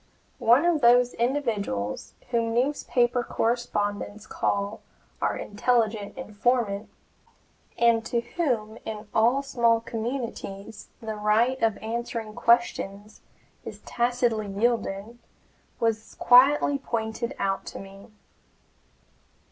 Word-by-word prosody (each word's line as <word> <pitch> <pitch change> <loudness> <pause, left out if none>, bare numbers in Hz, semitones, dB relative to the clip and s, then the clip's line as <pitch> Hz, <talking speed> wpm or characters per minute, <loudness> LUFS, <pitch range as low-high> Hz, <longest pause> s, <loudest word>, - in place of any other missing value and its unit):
One 245 +8 +5
of 340 -4 +2
those 245 +1 +5
individuals 225 - -2 0.2
whom 230 -1 0
newspaper 245 -2 +1
correspondents 215 -3 -2
call 200 0 -2 0.4
"our - - 0
intelligent 220 0 0
informant," 220 -3 -1 0.9
and 235 -1 +4
to 235 - 0
whom 235 -7 -2
in 215 -1 -6
all 240 +5 +3
small 235 -4 +2
communities 225 -4 -5
the 220 -1 -4
right 220 +5 +2
of 225 -2 +2
answering 230 -1 -4
questions 215 -3 0 0.4
is - - -8
tacitly 240 -3 0
yielded, 215 +1 -1 0.6
was 225 -1 -1
quietly 275 +3 +5
pointed 230 0 -3
out 195 0 -1
to - - -7
me. 195 0 -12
230 Hz, 100 wpm, -26 LUFS, 210-245 Hz, 0.9 s, One